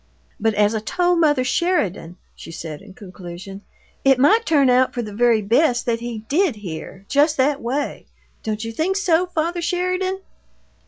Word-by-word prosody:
"But 220 Hz, 0 st, +1 dB
as 210 Hz, +1 st, +3 dB
I 220 Hz, -, -1 dB
told 350 Hz, +10 st, +1 dB
mother 295 Hz, -5 st, +3 dB
Sheridan," 225 Hz, -, -1 dB, 0.2 s
she -, -, -11 dB
said, 160 Hz, -1 st, -7 dB
in 195 Hz, -2 st, -14 dB
conclusion, 190 Hz, 0 st, -10 dB, 0.4 s
"it 270 Hz, -1 st, +5 dB
might 415 Hz, -, +4 dB
turn 290 Hz, -5 st, +4 dB
out 255 Hz, +1 st, +3 dB
for 240 Hz, -, -2 dB
the 210 Hz, -2 st, -8 dB
very 230 Hz, 0 st, +3 dB
best 245 Hz, +4 st, +2 dB
that 230 Hz, -1 st, 0 dB
he 230 Hz, -2 st, -6 dB
did 330 Hz, -, +1 dB
hear 190 Hz, 0 st, -8 dB
just 295 Hz, +2 st, +2 dB
that 275 Hz, +2 st, +1 dB
way. 270 Hz, +5 st, -3 dB, 0.3 s
Don't 215 Hz, 0 st, -3 dB
you 225 Hz, -, -4 dB
think 345 Hz, -, -1 dB
so, 365 Hz, -3 st, +2 dB
father 340 Hz, +1 st, -2 dB
Sheridan?" 365 Hz, +2 st, -1 dB
255 Hz, 170 wpm, -21 LUFS, 210-330 Hz, 0.4 s, it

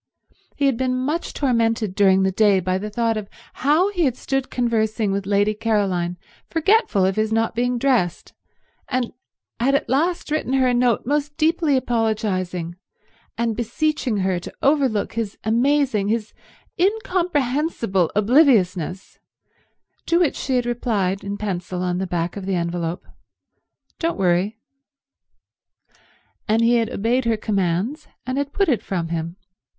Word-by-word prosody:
He 285 Hz, -, 0 dB
had 270 Hz, -4 st, +2 dB
been 255 Hz, 0 st, 0 dB
much 295 Hz, +7 st, -2 dB
tormented 230 Hz, -6 st, 0 dB
during 195 Hz, -1 st, +4 dB
the 190 Hz, -, +2 dB
day 200 Hz, 0 st, +4 dB
by 185 Hz, +1 st, -1 dB
the 210 Hz, +2 st, -5 dB
thought 225 Hz, +1 st, 0 dB
of 210 Hz, -2 st, -6 dB, 0.3 s
how 315 Hz, +9 st, +3 dB
he 355 Hz, -5 st, +1 dB
had 255 Hz, -2 st, 0 dB
stood 270 Hz, -1 st, -2 dB
conversing 220 Hz, -3 st, 0 dB
with 195 Hz, 0 st, -2 dB
Lady 205 Hz, +1 st, +2 dB
Caroline 200 Hz, -6 st, 0 dB, 0.3 s
forgetful 325 Hz, -, +2 dB
of 190 Hz, +1 st, 0 dB
his 215 Hz, 0 st, +1 dB
not 225 Hz, 0 st, +1 dB
being 245 Hz, +1 st, 0 dB
dressed, 235 Hz, -9 st, 0 dB, 0.5 s
and 255 Hz, -2 st, -2 dB, 0.5 s
had 270 Hz, +4 st, +2 dB
at -, -, 0 dB
last 320 Hz, +4 st, 0 dB
written 305 Hz, -4 st, -1 dB
her 265 Hz, -1 st, +3 dB
a 250 Hz, -, +2 dB
note 245 Hz, -2 st, +2 dB
most 295 Hz, +2 st, -1 dB
deeply 315 Hz, -3 st, +2 dB
apologizing, 205 Hz, -8 st, -1 dB, 0.6 s
and 230 Hz, -1 st, 0 dB
beseeching 245 Hz, +1 st, -1 dB
her 185 Hz, -2 st, 0 dB
to -, -, -9 dB
overlook 270 Hz, -7 st, +2 dB
his 225 Hz, -3 st, -3 dB
amazing, 245 Hz, -1 st, +2 dB
his 220 Hz, 0 st, -2 dB, 0.5 s
incomprehensible 315 Hz, -, 0 dB
obliviousness, 205 Hz, -, +2 dB, 0.9 s
to 340 Hz, -, +3 dB
which 345 Hz, -5 st, +2 dB
she 265 Hz, -, -2 dB
had 245 Hz, -1 st, +1 dB
replied 210 Hz, -6 st, -1 dB
in 200 Hz, 0 st, -4 dB
pencil 180 Hz, -3 st, -3 dB
on 180 Hz, 0 st, -1 dB
the 190 Hz, -, -2 dB
back 175 Hz, -1 st, -2 dB
of 195 Hz, -2 st, -6 dB
the 195 Hz, -, 0 dB
envelop, 170 Hz, 0 st, -3 dB, 0.9 s
"Don't 330 Hz, 0 st, -1 dB
worry." 190 Hz, +3 st, +1 dB, 1.9 s
And 225 Hz, +2 st, +2 dB
he 235 Hz, +1 st, +4 dB
had 230 Hz, -2 st, 0 dB
obeyed 235 Hz, +5 st, 0 dB
her 230 Hz, -1 st, +1 dB
commands, 205 Hz, -, -1 dB, 0.2 s
and 255 Hz, +2 st, -2 dB
had 285 Hz, 0 st, -2 dB
put 395 Hz, +4 st, +1 dB
it 245 Hz, -10 st, +1 dB
from 175 Hz, -6 st, -3 dB
him. 165 Hz, 0 st, -3 dB
225 Hz, 150 wpm, -22 LUFS, 195-270 Hz, 1.9 s, during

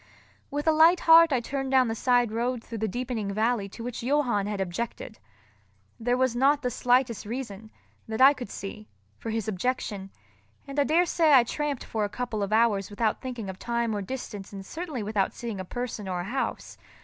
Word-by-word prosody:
With 290 Hz, +1 st, -3 dB
a 320 Hz, -, +5 dB
light 325 Hz, +3 st, +5 dB
heart 330 Hz, 0 st, +7 dB
I 260 Hz, -, +3 dB
turned 270 Hz, +2 st, -3 dB
down 260 Hz, -2 st, +4 dB
the 225 Hz, -, -1 dB
side 245 Hz, 0 st, +2 dB
road 235 Hz, +1 st, -1 dB
through 230 Hz, -1 st, -7 dB
the 220 Hz, -, 0 dB
deepening 235 Hz, -2 st, -3 dB
valley 215 Hz, 0 st, 0 dB
to 230 Hz, -, -9 dB
which 245 Hz, 0 st, -5 dB
Johann 245 Hz, -6 st, +1 dB
had 210 Hz, -1 st, -3 dB
objected. 195 Hz, +4 st, -4 dB, 0.8 s
There 245 Hz, +2 st, +1 dB
was 260 Hz, -2 st, +1 dB
not 280 Hz, +3 st, +3 dB
the 250 Hz, -, 0 dB
slightest 245 Hz, -1 st, +1 dB
reason, 220 Hz, -2 st, -6 dB, 0.4 s
that 220 Hz, 0 st, -4 dB
I 270 Hz, +2 st, +8 dB
could 245 Hz, -7 st, -8 dB
see, 210 Hz, +2 st, -7 dB, 0.3 s
for 225 Hz, -, -5 dB
his 220 Hz, -2 st, -2 dB
objection; 205 Hz, -2 st, -2 dB, 0.6 s
and 275 Hz, +1 st, -4 dB
I 285 Hz, -, +4 dB
daresay 330 Hz, -1 st, +3 dB
I 255 Hz, -3 st, +8 dB
tramped 290 Hz, +2 st, -3 dB
for 220 Hz, -2 st, -2 dB
a 205 Hz, -, -1 dB
couple 235 Hz, -2 st, -3 dB
of 200 Hz, 0 st, -2 dB
hours 215 Hz, -3 st, +2 dB
without 215 Hz, +1 st, -1 dB
thinking 245 Hz, -5 st, -5 dB
of 190 Hz, 0 st, -7 dB
time 235 Hz, -2 st, -1 dB
or 205 Hz, -, -2 dB
distance 205 Hz, -2 st, -6 dB
and 195 Hz, -1 st, -8 dB
certainly 315 Hz, -, -5 dB
without 205 Hz, -2 st, -1 dB
seeing 230 Hz, -5 st, -5 dB
a 185 Hz, -, -5 dB
person 235 Hz, -1 st, -5 dB
or 180 Hz, -1 st, -2 dB
a -, -, -4 dB
house. 245 Hz, +8 st, -4 dB
235 Hz, 200 wpm, -27 LUFS, 210-260 Hz, 0.8 s, I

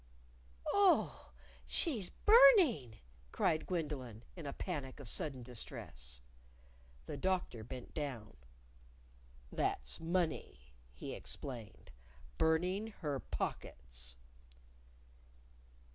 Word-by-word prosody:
"Oh, 400 Hz, -3 st, +3 dB, 0.4 s
she's 240 Hz, -, +1 dB
burning!" 385 Hz, -, +6 dB, 0.3 s
cried 155 Hz, -, +1 dB
Gwendolyn, 140 Hz, -, -3 dB
in 165 Hz, -5 st, -6 dB
a 140 Hz, -, -3 dB
panic 145 Hz, -8 st, -4 dB
of 140 Hz, -, -8 dB
sudden 135 Hz, -, 0 dB
distress. 65 Hz, -, -5 dB, 0.8 s
The -, -, -5 dB
Doctor 185 Hz, -12 st, 0 dB
bent 125 Hz, +2 st, -8 dB
down. 130 Hz, -, -4 dB, 1.2 s
"That's -, -, -1 dB
money," 160 Hz, -, -2 dB, 0.2 s
he -, -, -6 dB
explained; 115 Hz, -8 st, -7 dB, 0.2 s
" 60 Hz, -, -22 dB
burning 180 Hz, +6 st, +2 dB
her 145 Hz, -3 st, -1 dB
pockets." 60 Hz, -, -5 dB
145 Hz, 85 wpm, -36 LUFS, 110-180 Hz, 1.2 s, burning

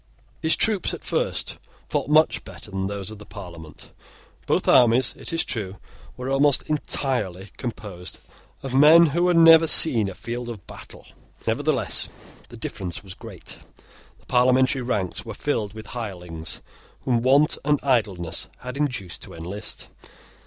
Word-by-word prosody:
His 160 Hz, -, +3 dB
troops 215 Hz, -5 st, +3 dB
at -, -, -13 dB
first -, -, -2 dB, 0.3 s
fought -, -, -2 dB
much 155 Hz, +1 st, +3 dB
better 105 Hz, -, -12 dB
than 95 Hz, 0 st, -2 dB
those 100 Hz, 0 st, -5 dB
of 110 Hz, -, -10 dB
the -, -, -10 dB
Parliament. 85 Hz, -6 st, -11 dB, 0.5 s
Both -, -, 0 dB
armies, 120 Hz, 0 st, +5 dB
it -, -, -7 dB
is 165 Hz, 0 st, 0 dB
true, 100 Hz, -5 st, -4 dB, 0.4 s
were 125 Hz, 0 st, -6 dB
almost 135 Hz, +1 st, +3 dB
entirely 115 Hz, -10 st, -2 dB
composed 100 Hz, -7 st, -7 dB, 0.5 s
of 135 Hz, -2 st, -5 dB
men 155 Hz, +5 st, +7 dB
who 175 Hz, +2 st, +2 dB
had 175 Hz, -1 st, +3 dB
never 165 Hz, 0 st, +8 dB
seen 120 Hz, -10 st, +6 dB
a 95 Hz, -, -9 dB
field 120 Hz, +3 st, -6 dB
of 110 Hz, -5 st, -8 dB
battle. -, -, -13 dB, 0.4 s
Nevertheless, -, -, +1 dB, 0.4 s
the -, -, -11 dB
difference 90 Hz, -1 st, -6 dB
was 95 Hz, -2 st, -10 dB
great. -, -, -11 dB, 0.6 s
The -, -, -26 dB
Parliamentary 130 Hz, +1 st, +3 dB
ranks 100 Hz, -7 st, -2 dB
were 115 Hz, -3 st, -8 dB
filled 110 Hz, -8 st, -2 dB
with 110 Hz, -, -9 dB
hirelings 90 Hz, -8 st, -5 dB, 0.4 s
whom 120 Hz, -3 st, 0 dB
want 140 Hz, +5 st, +3 dB
and 145 Hz, 0 st, +2 dB
idleness 100 Hz, -, 0 dB
had 125 Hz, +2 st, -7 dB
induced 115 Hz, -, -3 dB
to -, -, -9 dB
enlist. 90 Hz, +6 st, -6 dB
120 Hz, 150 wpm, -23 LUFS, 95-140 Hz, 0.6 s, never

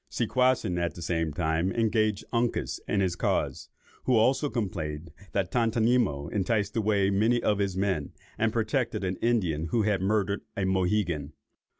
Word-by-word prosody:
Seaquassin, 120 Hz, -6 st, +1 dB
at 85 Hz, -1 st, -2 dB
the 85 Hz, -, -8 dB
same 80 Hz, -2 st, -1 dB
time, 80 Hz, +3 st, 0 dB
engaged 110 Hz, -1 st, +1 dB
Uncas 120 Hz, 0 st, 0 dB
in 100 Hz, -, +1 dB
his 90 Hz, -2 st, 0 dB
cause, -, -, -1 dB, 0.4 s
who 130 Hz, -, +3 dB
also 130 Hz, +6 st, +3 dB
complained 85 Hz, -, -4 dB, 0.2 s
that 95 Hz, -2 st, 0 dB
Tontonimo 115 Hz, -, +1 dB
enticed 105 Hz, 0 st, 0 dB
away 100 Hz, -3 st, +2 dB
many 110 Hz, +5 st, +3 dB
of 105 Hz, -1 st, +2 dB
his 95 Hz, -2 st, -1 dB
men, 95 Hz, -7 st, -1 dB, 0.2 s
and 115 Hz, 0 st, +1 dB
protected 120 Hz, +1 st, -1 dB
an 95 Hz, 0 st, -2 dB
Indian 90 Hz, -10 st, 0 dB
who 110 Hz, +6 st, +1 dB
had 105 Hz, -3 st, +1 dB
murdered 100 Hz, 0 st, 0 dB, 0.2 s
a 100 Hz, -, 0 dB
Mohegan. 90 Hz, -5 st, 0 dB
100 Hz, 155 wpm, -28 LUFS, 90-115 Hz, 0.4 s, who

